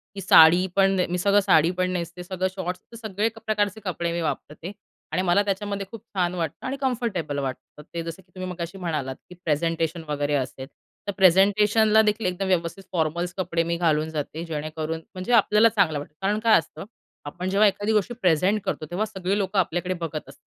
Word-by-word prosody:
की 195 - -5
साडी 175 0 +7
पण 195 -1 +3
मी 180 - -1
सगळं 200 +3 +4
साडी 175 -4 +4
पण 185 0 +1
नेसते 175 0 -4
सगळं 185 +1 -2
शॉर्ट्स, 180 -1 -4
तर 230 - -10
सगळे 210 +2 0 0.2
प्रकारचे 210 -1 0
कपडे 170 -2 -2
मी 170 - -2
वापरते 160 +2 -4 0.4
आणि 185 - 0
मला 185 +2 +3
त्याच्यामध्ये 200 0 -2
खूप 230 -3 -9
छान 180 -2 +1
वाटतं 165 -3 -4
आणि 265 +2 -3
कम्फर्टेबल 220 - -1
वाटतं. 135 +2 -6
ते 170 -1 -3
जसं 165 +2 -7
की 180 - -33
तुम्ही 185 0 -5
मगाशी 175 +1 -6
म्हणालात 150 -7 -3
की 180 - -11
प्रेझेंटेशन 165 +1 0
वगैरे 145 0 -1
असेल 130 -1 -3 0.4
तर 200 - +1
प्रेझेंटेशनला 210 +4 +5
देखील 215 +1 0
एकदम 185 +1 -1
व्यवस्थित 180 +1 -1
फॉर्मल्स 170 +1 -1
कपडे 170 -2 0
मी 170 0 -1
घालून 160 -2 +1
जाते 155 +1 -4
जेणेकरून 155 0 -4
म्हणजे 185 +4 -4
आपल्याला 215 0 +5
चांगलं 185 -9 +1
वाटतं. 145 - -10
कारण 205 +2 +1
काय 225 0 +5
असतं, - - -9 0.4
आपण 175 +6 -4
जेव्हा 205 +2 +5
एखादी 205 +2 0
गोष्टी 215 +3 +1
प्रेझेंट 185 +4 +2
करतो 155 - -2
तेव्हा 195 +5 0
सगळी 195 -2 -2
लोकं 195 0 0
आपल्याकडे 180 +1 0
बघत 165 -4 -4
असतात. 140 +1 -16
180 Hz, 190 wpm, -24 LUFS, 165-200 Hz, 0.4 s, साडी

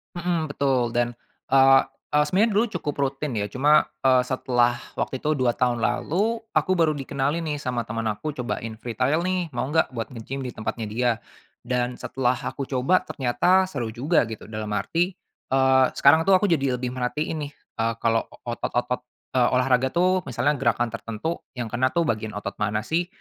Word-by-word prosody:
Mhm, 170 -3 -1
betul 130 -4 +1
dan, 120 0 0 0.3
eee 135 0 +6 0.3
eee, 150 0 +4
sebenarnya 205 +8 +3
dulu 210 +3 +3
cukup 150 -4 -2
rutin 140 +1 -1
ya 105 -3 -1
cuma, 145 +7 +4 0.2
eee, 130 -1 +5
setelah 120 -2 +2 0.2
waktu 130 - -2
itu 150 - 0
2 120 -2 +2
tahun 125 -2 +1
lalu, 215 - 0
aku 185 - +1
baru 165 -3 +3
dikenalin 140 +1 -1
nih 150 - -1
sama 125 -5 -3
teman 115 +1 -3
aku 150 +8 -5
cobain 115 -3 -4
free 115 +2 -6
trial 135 +9 +1
nih, 185 -1 0
mau 120 - 0
enggak 160 +1 +3
buat 115 +2 -4
nge-gym 130 +3 -6
di 125 - -4
tempatnya 110 +1 -4
dia, 120 +2 +2 0.5
dan 125 0 -1
setelah 130 -1 0
aku 135 +2 -5
coba 135 +8 +2
ternyata 145 +9 +2
seru 120 -7 -3
juga 140 0 +2
gitu 110 -1 -9
dalam 110 -1 -4
arti, 175 - 0 0.3
eee, 130 0 +4
sekarang 160 +5 +5
tuh 195 - +7
aku 185 - +2
jadi 135 -5 +2
lebih 125 0 -3
merhatiin 145 +4 -2
nih, - - -13 0.3
eee, 115 0 +1
kalau 115 0 +2 0.2
otot-otot 120 +1 -2 0.3
eee, 125 -2 +3
olahraga 125 0 +2
tuh, 180 0 +2
misalnya 130 +3 0
gerakan 120 -2 +1
tertentu 115 +8 -4 0.2
yang 120 -3 -4
kena 130 +2 +2
tuh 170 +5 +1
bagian 110 -6 -2
otot 100 -1 -5
mana 105 +1 0
sih. 170 +5 0
130 Hz, 180 wpm, -24 LUFS, 120-155 Hz, 0.5 s, tuh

